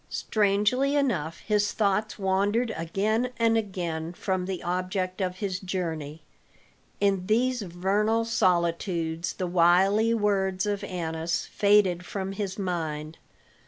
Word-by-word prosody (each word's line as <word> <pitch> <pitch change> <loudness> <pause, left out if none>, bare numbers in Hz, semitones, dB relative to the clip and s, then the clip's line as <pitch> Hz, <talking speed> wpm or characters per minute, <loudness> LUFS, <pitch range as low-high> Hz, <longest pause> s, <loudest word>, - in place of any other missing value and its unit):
Strangely 215 +7 +1
enough 190 - 0
his 210 -1 +1
thoughts 215 0 0
wandered 205 +4 +1
again 210 +9 0
and 230 -1 +3
again 175 -6 -2
from 185 0 -2
the 190 -2 -4
object 185 +1 -2
of 180 -1 -1
his 185 -1 -3
journey; 165 -5 -4 0.8
in 195 -2 +1
these 245 +3 +2
vernal 205 +5 0
solitudes 170 -5 0
the 185 - -3
wily 185 +5 +4
words 195 -3 +1
of 205 -1 -2
Annas 165 -3 -2
faded 200 -4 +3
from 190 +1 -4
his 195 -1 -4
mind. 160 -5 -3
190 Hz, 120 wpm, -27 LUFS, 175-210 Hz, 0.8 s, wily